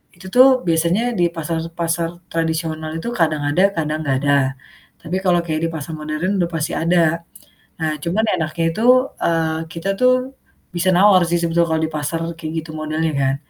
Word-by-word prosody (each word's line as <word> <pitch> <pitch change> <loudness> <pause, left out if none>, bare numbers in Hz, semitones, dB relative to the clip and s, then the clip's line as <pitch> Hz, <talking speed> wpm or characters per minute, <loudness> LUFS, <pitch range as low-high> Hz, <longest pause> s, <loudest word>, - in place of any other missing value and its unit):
itu 185 +2 -12
tuh 255 +1 +9 0.2
biasanya 170 +5 +2 0.2
di 175 - +4
pasar-pasar 165 +1 -2 0.2
tradisional 160 -1 -2
itu 200 +9 -4
kadang 155 -3 +2
ada 160 +6 +2 0.2
kadang 155 -1 -1
enggak 135 -2 +1
ada, 145 0 +2 0.7
tapi 165 +3 -4
kalau 175 -2 +4
kayak 155 -1 -2
di - - -1
pasar 160 +1 -6
modern 155 +6 -2
udah 170 -1 +1
pasti 155 -2 -2
ada. 170 0 +2 0.6
Nah 160 -1 0
cuman 190 +6 0
enaknya 160 0 -2
itu, 220 - -4 0.4
eee, 160 -1 +1
kita 165 +3 -4
tuh 255 0 +5 0.6
bisa 175 +2 +1
nawar 190 0 +6
sih 175 - +2
sebetulnya 170 0 +1
kalau 160 0 +1
di 160 - -10
pasar 150 +3 -2 0.2
kayak 160 -2 -6
gitu 160 - -10
modelnya 155 +1 -1
kan. 135 0 +1
165 Hz, 175 wpm, -20 LUFS, 155-170 Hz, 0.7 s, tuh